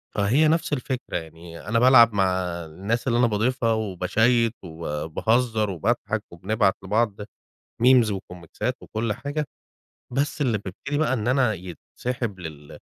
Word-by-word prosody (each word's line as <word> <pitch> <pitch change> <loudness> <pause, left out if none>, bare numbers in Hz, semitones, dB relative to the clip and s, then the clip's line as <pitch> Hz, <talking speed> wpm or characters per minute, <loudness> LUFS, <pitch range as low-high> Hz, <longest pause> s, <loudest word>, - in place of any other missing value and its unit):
فهي 120 +10 +3
نَفْس 165 0 +1
الفكرة، 130 -7 -3
يعني 80 0 -10
أنا 115 +2 +2
بالعب 120 -2 +7
مع 100 -2 +3 0.4
الناس 100 - -3
اللي 120 -1 +2
أنا 120 - +5
باضيفها 115 +2 +1
وباشيّت 110 +3 +1
وبا 80 -2 -5
وباهزّر 110 +5 +1
وباضحَك 90 -5 -1
وبنبعت 95 +3 +1
لبعض 105 +1 0 0.6
memes 125 -3 +6
وكوميكسات 95 +5 -4
وكلّ 110 0 -2
حاجة. 145 +6 -3 0.7
بس 145 +3 -1
اللي 120 -6 +2
بيبتدي 105 +9 -5
بقى 150 -3 +1
إن 115 -3 -2
أنا 125 -3 +3
يتسحِب 100 +4 -5
لل 75 -4 -9
110 Hz, 135 wpm, -24 LUFS, 95-125 Hz, 0.7 s, بالعب